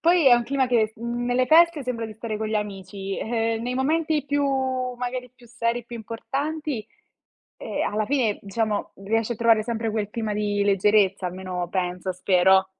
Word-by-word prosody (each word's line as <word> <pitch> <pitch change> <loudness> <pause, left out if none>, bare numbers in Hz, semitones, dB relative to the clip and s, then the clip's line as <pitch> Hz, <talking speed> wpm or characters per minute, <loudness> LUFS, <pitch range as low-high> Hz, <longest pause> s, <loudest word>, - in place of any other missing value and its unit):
Poi 340 -2 +4
è 245 - +8
un 240 0 +1
clima 265 +1 +1
che, 225 -3 +2
mhmm, 235 +1 -3
nelle 250 +1 +2
feste 330 0 +5
sembra 235 -3 -3
di 215 - -9
stare 220 0 -4
con 220 - -2
gli 220 - -2
amici, 195 -1 -4
ehm, 225 0 -1
nei 250 +1 -2
momenti 300 +2 +1
più 285 0 0 0.5
magari 250 0 -4
più 245 -1 -18
seri, 235 0 -2
più 235 0 -8
importanti, 275 +4 -4 0.7
ehm, - - -2
alla 215 0 0
fine, 250 -7 +1
diciamo, 210 +1 -2
riesci 225 +3 0
a - - -7
trovare 230 -1 +4
sempre 225 0 -2
quel 210 -2 -2
clima 220 -2 -3
di 205 -1 0
leggerezza, 200 -1 +3
almeno 180 -1 -4
penso, 180 0 -2
spero. 190 +1 +4
225 Hz, 180 wpm, -24 LUFS, 205-250 Hz, 0.7 s, è